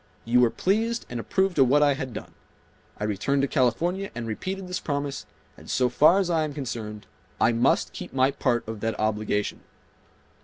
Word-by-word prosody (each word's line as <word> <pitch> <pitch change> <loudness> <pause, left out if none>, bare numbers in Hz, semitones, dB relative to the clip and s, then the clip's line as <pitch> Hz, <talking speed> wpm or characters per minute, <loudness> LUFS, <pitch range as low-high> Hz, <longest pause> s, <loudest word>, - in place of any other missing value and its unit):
You 120 +2 +3
were 120 - +5
pleased 225 - 0
and 120 - -3
approved 190 +6 0
of 135 - +6
what 145 +4 +4
I 145 -1 +4
had 135 -2 -5
done. - - -8 0.7
I - - -3
returned 135 +7 0
to - - +2
California 165 - 0
and 120 -1 -4
repeated 185 - -4
this 180 +2 -3
promise, 145 -4 -3 0.3
and - - -14
so 125 -1 +2
far 150 +9 +5
as 195 -2 +1
I 160 -2 +2
am 150 -2 -4
concerned, 110 -6 -5 0.3
I 115 - +4
must 120 +3 +2
keep - - -7
my 130 +1 +3
part 120 -5 0
of 110 -1 -5
that 115 +1 -2
obligation." 105 -1 -1
135 Hz, 190 wpm, -26 LUFS, 115-165 Hz, 0.7 s, of